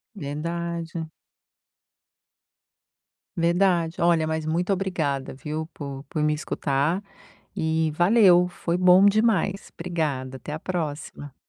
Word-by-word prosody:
Verdade. 170 +1 -4 2.2
Verdade. 170 -1 +1
Olha, 170 -2 +3
mas 160 0 -2
muito 175 +5 0
obrigada, 160 -8 -2
viu, 150 +4 -5
por 140 -2 -7
por 155 - -2
me 150 0 +2
escutar 150 +3 -1 0.6
e 160 0 0
valeu, 180 0 +5
foi 175 -1 -2
bom 180 +1 +6
demais. 205 -2 +2
Obrigada, 150 -7 -3
até 130 +3 -8
a 155 - -4
próxima. 150 -5 -5
165 Hz, 105 wpm, -25 LUFS, 150-180 Hz, 2.2 s, bom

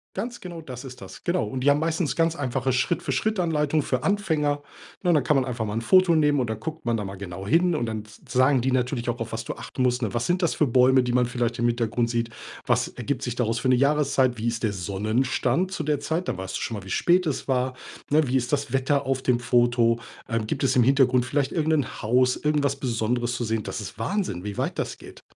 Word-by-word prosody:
Ganz 240 +5 -4
genau, 170 -2 -7
das 130 -3 -8
ist 130 -1 -10
das, - - -11
genau. 175 +1 +1
Und 130 - -4
die 145 - +5
haben 145 - +4
meistens 160 -1 -1
ganz 165 0 +2
einfache 130 -2 -1
Schritt-für-Schritt-Anleitung 150 +2 0
für 130 -1 -1
Anfänger, 155 -6 0 0.4
ne? 180 - +1
Und - - +5
dann 145 - +3
kann 150 - +2
man 130 -1 +2
einfach 120 -3 -3
mal 105 - -4
'n 115 - -1
Foto 185 +6 +5
nehmen 150 -2 +3
und 120 -3 -1
dann 110 -1 -3
guckt 160 -1 -6
man 115 -1 +1
da 105 - -4
mal 95 - -6
genau 95 0 -7
hin 175 +4 +3
und 120 - -1
dann 110 -1 -3
s 105 0 -16
sagen 130 0 +3
die 130 +1 0
natürlich 125 -1 0
auch, 120 +1 -2
auf 115 -1 -4
was 115 0 -4
du - - -4
achten 130 - -4
musst, 125 0 +1
ne? 110 -5 -1
Was 120 - 0
sind 180 +1 +1
das 170 - +1
für 150 - +3
Bäume, 130 +1 +4
die 125 - -1
man 125 -1 +3
vielleicht 120 -1 -2
im 120 - +2
Hintergrund 115 0 0
sieht? 115 -1 -1 0.3
Was - - +2
ergibt 125 +2 -4
sich 125 -2 -3
daraus 115 -2 0
für 130 - 0
'ne 130 - +5
Jahreszeit? 140 -2 +2
Wie 115 - -2
ist 115 0 -2
der 105 -2 +1
Sonnenstand 120 - 0
zu 170 -5 -3
der 150 -1 0
Zeit? 170 +3 -2
Da - - -1
weißt 95 0 -4
du - - -6
schon 115 - -3
mal, 100 - -8
wie 95 - -11
spät 180 - +2
es 145 - -3
war, 130 0 0 0.3
ne? 150 0 +3
Wie 130 +2 +2
ist 120 -1 -2
das 140 -3 -1
Wetter 135 +2 +1
auf 135 -1 0
dem 125 -2 +2
Foto? 120 -1 +2 0.3
Ähm, 115 -1 -2
gibt - - -2
es 135 - +2
im 125 - +5
Hintergrund 130 -1 +4
vielleicht 140 +1 0
irgen 160 -2 0
'nen 145 -7 0
Haus, 125 +3 +3
irgendwas 145 -2 +1
Besonderes 120 -1 -1
zu 120 - -2
sehen? 110 -1 -1
Das - - -5
ist - - -9
Wahnsinn, 185 - -2
wie 105 -1 -5
weit - - -2
das - - -3
geht. - - -14
130 Hz, 255 wpm, -25 LUFS, 120-150 Hz, 0.4 s, die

